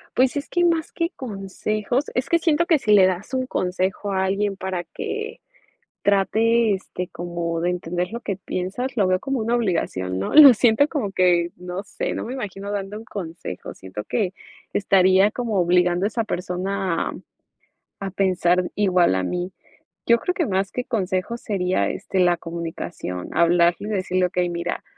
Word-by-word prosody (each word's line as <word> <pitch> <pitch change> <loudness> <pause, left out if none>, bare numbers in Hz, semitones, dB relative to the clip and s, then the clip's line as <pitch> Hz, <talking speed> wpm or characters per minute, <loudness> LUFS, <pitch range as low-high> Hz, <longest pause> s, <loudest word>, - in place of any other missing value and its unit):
Pues, 255 0 +3
es 285 - -3
que, 350 - +1
más 335 -2 +1
que 335 0 -1
consejos 215 +3 -2
es 255 +2 -1
que 335 - +4
siento 335 0 +2
que, 330 - +5
si 215 -6 -1
le 195 -2 +7
das 185 +6 -3
un 255 0 -1
consejo 185 0 -1
a 190 0 +1
alguien, 200 +1 0
para 190 -2 -3
que 435 - -5 0.6
trate, 220 +3 +3
este, 185 -1 -5
como 170 -1 -4
de 175 - +1
entender 180 0 -2
lo 235 - -4
que 200 -5 -3
piensas, 195 +7 -4
lo 200 -4 +3
veo 185 0 +1
como 270 -1 -2
una 230 +2 0
obligación, 130 - -1
¿no? 95 - -3
Lo 290 -4 +11
siento, 240 +5 +3
como 230 -11 -2
que, 175 -2 +3
no 180 +2 -6
sé. 200 - -4
No - - -4
me 245 - -5
imagino, 200 -5 -5
dando 205 0 -4
un 220 - -10
consejo. 165 - -7
Siento 95 +2 -8
que, 195 - -1 0.4
estaría 190 0 +4
como, 230 -4 -2
obligando 180 +1 +2
a - - +4
esa 230 +1 -1
persona, 185 -1 -2
a - - -8 0.9
a 195 - -3
pensar 180 -2 +1
igual 185 - +3
a 95 - 0
mí. 180 - -3 0.5
Yo 235 - +5
creo, 360 - -1
que 345 - 0
más 190 0 0
que 250 - -2
consejos, 200 -1 -2
sería, 180 - 0
este, 190 - -3
la 175 -1 +4
comunicación, 165 - -6
hablarle 170 +3 +3
y - - -3
decirle: 185 -2 +1
"Okey, 180 0 0
mira, 170 0 -3
190 Hz, 180 wpm, -23 LUFS, 180-225 Hz, 0.9 s, Lo